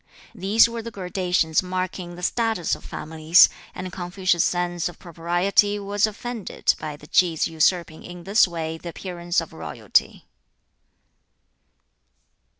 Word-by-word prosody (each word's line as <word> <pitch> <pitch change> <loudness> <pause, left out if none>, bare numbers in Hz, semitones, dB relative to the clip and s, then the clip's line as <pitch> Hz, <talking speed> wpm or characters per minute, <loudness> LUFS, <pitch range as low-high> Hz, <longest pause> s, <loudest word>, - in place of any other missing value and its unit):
These 205 +5 +4
were 235 0 -5
the 230 - -7
gradations 180 -5 0
marking 185 -1 -4
the 180 - -10
status 225 -3 0
of - - -4
families, 160 +3 +4 0.3
and 185 0 -6
Confucius's 180 -1 0
sense 175 -1 -1
of 175 - -13
propriety 175 +4 +1
was 205 +1 0
offended 230 0 -2
at 150 -1 -6
the - - -12
Ki's 165 0 +2
usurping 165 0 0
in 175 -1 -10
this 200 +3 +4
way 160 -2 -5
the 170 - -7
appearance 175 0 -3
of 165 - -10
royalty. 80 -2 -1
180 Hz, 130 wpm, -23 LUFS, 170-195 Hz, 0.3 s, These